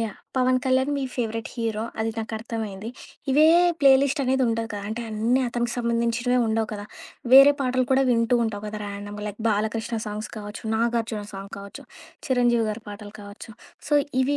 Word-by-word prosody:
Yeah! 225 Hz, -3 st, -3 dB, 0.2 s
'Pawan 255 Hz, 0 st, +3 dB
Kalyan' 260 Hz, +2 st, +2 dB
మీ 275 Hz, -, -2 dB
favourite 225 Hz, -2 st, -3 dB
hero 225 Hz, -2 st, -2 dB, 0.2 s
అది 225 Hz, 0 st, 0 dB
నాకర్థమైంది. 220 Hz, -2 st, -5 dB, 0.4 s
ఇవే 300 Hz, +3 st, +5 dB, 0.4 s
ప్లే 275 Hz, -1 st, +7 dB
లిస్ట్ 280 Hz, +1 st, 0 dB
అనేది 265 Hz, +1 st, +2 dB
ఉండదు 230 Hz, 0 st, -1 dB
కదా! 205 Hz, -1 st, -5 dB
అంటే 230 Hz, +2 st, -4 dB
అన్నీ 230 Hz, +5 st, +1 dB
అతనికి 240 Hz, 0 st, -2 dB
సంబంధించినవే 235 Hz, +1 st, +1 dB
ఉండవు 220 Hz, 0 st, 0 dB
కదా! 205 Hz, 0 st, -5 dB, 0.5 s
వేరే 275 Hz, +2 st, +10 dB
పాటలు 255 Hz, -1 st, +1 dB
కూడా 265 Hz, +1 st, +4 dB
వింటూ 230 Hz, +1 st, +3 dB
ఉంటావు 205 Hz, -2 st, -4 dB
కదా 210 Hz, 0 st, -5 dB
ర్యాండమ్‌గా 205 Hz, +1 st, -6 dB
లైక్ 205 Hz, -, -8 dB
'బాలకృష్ణ' 220 Hz, +2 st, -1 dB
సాంగ్స్ 210 Hz, +1 st, -5 dB
కావచ్చు, 205 Hz, 0 st, -8 dB
'నాగార్జున' 225 Hz, -2 st, -1 dB
సాంగ్ 195 Hz, 0 st, -8 dB
కావచ్చు 200 Hz, +8 st, -10 dB, 0.4 s
'చిరంజీవి' 240 Hz, -3 st, +2 dB
గారి 220 Hz, +1 st, -6 dB
పాటలు 205 Hz, 0 st, -9 dB
కావచ్చు 205 Hz, +2 st, -11 dB, 0.4 s
సో 295 Hz, -, +2 dB, 0.3 s
ఇవి 285 Hz, +2 st, +1 dB
230 Hz, 165 wpm, -24 LUFS, 210-250 Hz, 0.5 s, వేరే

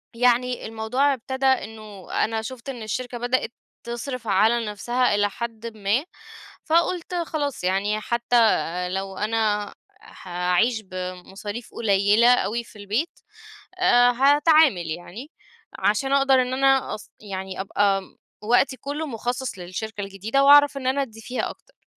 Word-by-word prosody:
يعني 250 Hz, +1 st, +2 dB
الموضوع 225 Hz, +6 st, 0 dB
ابتدى 265 Hz, +1 st, -4 dB
إنه 215 Hz, -6 st, -2 dB
أنا 225 Hz, 0 st, -2 dB
شُفت 250 Hz, +3 st, -8 dB
إن 245 Hz, -4 st, -6 dB
الشركة 245 Hz, +3 st, -4 dB
بدأت 245 Hz, 0 st, -1 dB, 0.3 s
تصرف 240 Hz, 0 st, -5 dB
على 220 Hz, +4 st, +3 dB
نفسها 240 Hz, +3 st, 0 dB
إلى 205 Hz, 0 st, +2 dB
حدٍ 230 Hz, 0 st, -6 dB
ما، 210 Hz, -, 0 dB, 0.6 s
فقُلت 335 Hz, +2 st, +1 dB
خلاص 300 Hz, -, -3 dB
يعني 200 Hz, +3 st, 0 dB
حتّى 240 Hz, +1 st, 0 dB, 0.5 s
لو 190 Hz, 0 st, -4 dB
أنا 210 Hz, -1 st, 0 dB, 0.3 s
حاعيش 180 Hz, +6 st, -1 dB
بمصاريف 190 Hz, +4 st, -7 dB
قليِّلة 205 Hz, +2 st, +3 dB
أوي 235 Hz, 0 st, -2 dB
في 230 Hz, -, -18 dB
البيت، 215 Hz, -, -3 dB, 0.6 s
آآ 245 Hz, -9 st, +5 dB
هاتعامل 285 Hz, -, +4 dB
يعني 195 Hz, -, -8 dB, 0.5 s
عشان 270 Hz, +6 st, +1 dB
أقدر 270 Hz, -2 st, +4 dB
إن 250 Hz, +1 st, -4 dB
أنا 270 Hz, 0 st, +2 dB
أص 215 Hz, -, -11 dB
يعني 190 Hz, -2 st, -6 dB
أبقى 195 Hz, 0 st, +1 dB
م -, -, -19 dB, 0.3 s
وقتي 245 Hz, +4 st, +2 dB
كُلّه 295 Hz, +4 st, -4 dB
مُخصص 245 Hz, -2 st, -4 dB
للشركة 200 Hz, +4 st, -6 dB
الجديدة 205 Hz, +7 st, -1 dB
وأعرف 290 Hz, 0 st, +7 dB
إن 260 Hz, -2 st, -5 dB
أنا 275 Hz, +2 st, +1 dB
أدّي 225 Hz, -4 st, -8 dB
فيها 250 Hz, +3 st, -3 dB
أكتر. -, -, -17 dB
230 Hz, 135 wpm, -24 LUFS, 205-265 Hz, 0.6 s, وأعرف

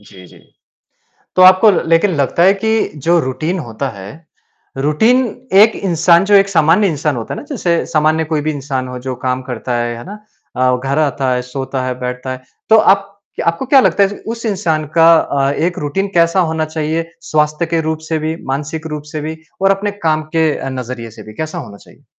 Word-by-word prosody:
जी, 95 Hz, -3 st, -15 dB
जी। -, -, -18 dB, 1.0 s
तो 185 Hz, -, +6 dB
आपको 185 Hz, +3 st, +7 dB, 0.2 s
लेकिन 165 Hz, +4 st, +3 dB
लगता 140 Hz, +4 st, +1 dB
है 190 Hz, +2 st, +6 dB
कि 220 Hz, +3 st, 0 dB, 0.3 s
जो 175 Hz, 0 st, +4 dB
रूटीन 155 Hz, +7 st, -3 dB
होता 135 Hz, -2 st, -4 dB
है, 100 Hz, -2 st, -10 dB, 0.7 s
रूटीन 220 Hz, -, +3 dB, 0.4 s
एक 220 Hz, 0 st, +4 dB
इंसान 170 Hz, -1 st, +3 dB
जो 205 Hz, +1 st, +2 dB
एक 195 Hz, 0 st, +5 dB
सामान्य 175 Hz, +3 st, +3 dB
इंसान 150 Hz, -3 st, -1 dB
होता 115 Hz, -2 st, -5 dB
है -, -, -7 dB
ना, -, -, -11 dB
जैसे 175 Hz, -, 0 dB
सामान्य 155 Hz, +1 st, +1 dB
कोई 155 Hz, -1 st, -1 dB
भी 155 Hz, +1 st, -2 dB
इंसान 135 Hz, -3 st, -4 dB
हो 125 Hz, 0 st, -6 dB
जो 130 Hz, -, -2 dB
काम 130 Hz, 0 st, -1 dB
करता 125 Hz, -1 st, -4 dB
है, 120 Hz, 0 st, -2 dB
है 120 Hz, -, -9 dB
ना? 205 Hz, +3 st, -8 dB, 0.4 s
अ, 130 Hz, 0 st, +2 dB
घर 140 Hz, +2 st, 0 dB
आता 140 Hz, -3 st, 0 dB
है, 125 Hz, -, -2 dB
सोता 130 Hz, +1 st, -4 dB
है, 125 Hz, -1 st, -4 dB
बैठता 125 Hz, +1 st, -4 dB
है, 130 Hz, 0 st, -8 dB, 0.3 s
तो 220 Hz, -, +8 dB
आप 195 Hz, -1 st, +3 dB, 0.3 s
आपको 170 Hz, +9 st, 0 dB
क्या 270 Hz, +1 st, +6 dB
लगता 205 Hz, -, +2 dB
है 200 Hz, +1 st, -3 dB, 0.2 s
उस 230 Hz, 0 st, -8 dB
इंसान 175 Hz, -7 st, -1 dB
का 165 Hz, 0 st, +6 dB
अ, 140 Hz, -2 st, 0 dB
एक 170 Hz, +5 st, -1 dB
रूटीन 150 Hz, +7 st, -2 dB
कैसा 170 Hz, +2 st, +3 dB
होना 160 Hz, 0 st, -1 dB
चाहिए 155 Hz, +1 st, -2 dB, 0.3 s
स्वास्थ्य 150 Hz, +2 st, +1 dB
के 165 Hz, 0 st, 0 dB
रूप 160 Hz, 0 st, -2 dB
से 160 Hz, -, 0 dB
भी, 155 Hz, +1 st, -3 dB
मानसिक 150 Hz, +4 st, -4 dB
रूप 150 Hz, -, -6 dB
से 155 Hz, -, -3 dB
भी 155 Hz, +2 st, -5 dB, 0.3 s
और 195 Hz, -, +4 dB
अपने 195 Hz, +1 st, 0 dB, 0.2 s
काम 155 Hz, 0 st, +2 dB
के 160 Hz, -1 st, +3 dB
अ, -, -, -5 dB
नज़रिए 125 Hz, -2 st, -6 dB
से 110 Hz, -, -12 dB
भी, 110 Hz, 0 st, -12 dB
कैसा 155 Hz, +5 st, -5 dB
होना 120 Hz, -10 st, -9 dB
चाहिए? -, -, -20 dB
155 Hz, 210 wpm, -16 LUFS, 130-180 Hz, 1.0 s, तो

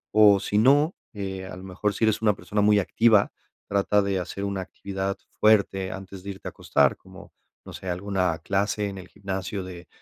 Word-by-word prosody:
O 105 Hz, -2 st, +7 dB
si 105 Hz, +1 st, -1 dB
no, 145 Hz, -, +4 dB, 0.2 s
eh, 95 Hz, -2 st, -5 dB
a 95 Hz, -, -8 dB
lo 95 Hz, -, -10 dB
mejor, 95 Hz, +2 st, -2 dB
si 105 Hz, -, -3 dB
eres 110 Hz, 0 st, +1 dB
una 105 Hz, -1 st, +4 dB
persona 105 Hz, +1 st, -2 dB
muy 105 Hz, 0 st, +5 dB
activa, 110 Hz, +1 st, +3 dB, 0.4 s
trata 100 Hz, +1 st, +2 dB
de 100 Hz, -1 st, 0 dB
hacer 90 Hz, +2 st, -5 dB
una 100 Hz, -1 st, -2 dB
actividad 95 Hz, +1 st, -4 dB, 0.2 s
fuerte 100 Hz, -3 st, +3 dB
antes 95 Hz, -1 st, -8 dB
de 100 Hz, -, -7 dB
irte 95 Hz, -, -9 dB
a -, -, -4 dB
acostar, -, -, +2 dB
como, 95 Hz, +2 st, -15 dB, 0.3 s
no -, -, -10 dB
sé, 95 Hz, -, -7 dB
alguna 90 Hz, -2 st, -1 dB
clase 100 Hz, +3 st, -1 dB
en 95 Hz, -, -8 dB
el 95 Hz, -1 st, -9 dB
gimnasio 95 Hz, 0 st, -4 dB
de 90 Hz, -1 st, -10 dB
100 Hz, 200 wpm, -25 LUFS, 95-105 Hz, 0.4 s, O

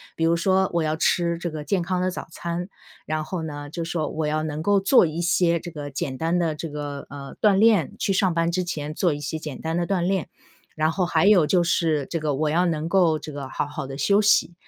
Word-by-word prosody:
比 165 Hz, -, -2 dB
如 165 Hz, +1 st, +3 dB
说， 190 Hz, +2 st, +2 dB
我 170 Hz, -1 st, +1 dB
要 155 Hz, 0 st, 0 dB
吃 170 Hz, +1 st, +1 dB
这 175 Hz, 0 st, -4 dB
个 155 Hz, -1 st, -6 dB
健 180 Hz, +5 st, 0 dB
康 180 Hz, +1 st, -1 dB
的 185 Hz, -, +1 dB
早 -, -, -7 dB
餐， 170 Hz, +2 st, -4 dB, 0.4 s
然 155 Hz, 0 st, -2 dB
后 165 Hz, +1 st, -4 dB
呢 145 Hz, -2 st, -6 dB
就 165 Hz, +3 st, -4 dB
是 165 Hz, -, -5 dB
说， 155 Hz, -3 st, -1 dB
我 155 Hz, -1 st, -2 dB
要 155 Hz, +1 st, 0 dB
能 155 Hz, 0 st, -4 dB
够 200 Hz, +4 st, +3 dB
做 195 Hz, +2 st, +5 dB
一 160 Hz, +1 st, -3 dB
些 170 Hz, 0 st, +2 dB
这 175 Hz, -, -8 dB
个 145 Hz, -2 st, -6 dB
简 135 Hz, -1 st, -4 dB
单 165 Hz, +5 st, 0 dB
的 165 Hz, -3 st, 0 dB
这 160 Hz, +2 st, -6 dB
个， 145 Hz, -1 st, -6 dB
呃， 140 Hz, -1 st, -9 dB
锻 210 Hz, -2 st, +5 dB
炼， 205 Hz, -4 st, +4 dB
去 200 Hz, -, +1 dB
上 190 Hz, -2 st, +2 dB
班 165 Hz, 0 st, +1 dB
之 180 Hz, +1 st, 0 dB
前 155 Hz, -4 st, -4 dB
做 175 Hz, -1 st, +1 dB
一 145 Hz, -, -5 dB
些 150 Hz, +2 st, -4 dB
简 150 Hz, -4 st, -7 dB
单 160 Hz, 0 st, -2 dB
的 175 Hz, -, 0 dB
锻 195 Hz, -3 st, 0 dB
炼。 185 Hz, 0 st, -1 dB, 0.5 s
然 155 Hz, 0 st, +1 dB
后 180 Hz, +1 st, 0 dB
还 185 Hz, -, +2 dB
有 195 Hz, -7 st, +5 dB
就 180 Hz, +1 st, +3 dB
是 160 Hz, -4 st, +1 dB
这 165 Hz, -, -3 dB
个 150 Hz, -2 st, -1 dB
我 155 Hz, +2 st, 0 dB
要 175 Hz, +3 st, +2 dB
能 160 Hz, -1 st, -1 dB
够 170 Hz, -4 st, +3 dB
这 155 Hz, 0 st, -9 dB
个 140 Hz, -2 st, -6 dB
好 -, -, -2 dB
好 145 Hz, -2 st, -6 dB
地 135 Hz, -, -7 dB
休 200 Hz, +8 st, +3 dB
息， 205 Hz, -4 st, +3 dB
165 Hz, 280 characters per minute, -24 LUFS, 150-180 Hz, 0.5 s, 做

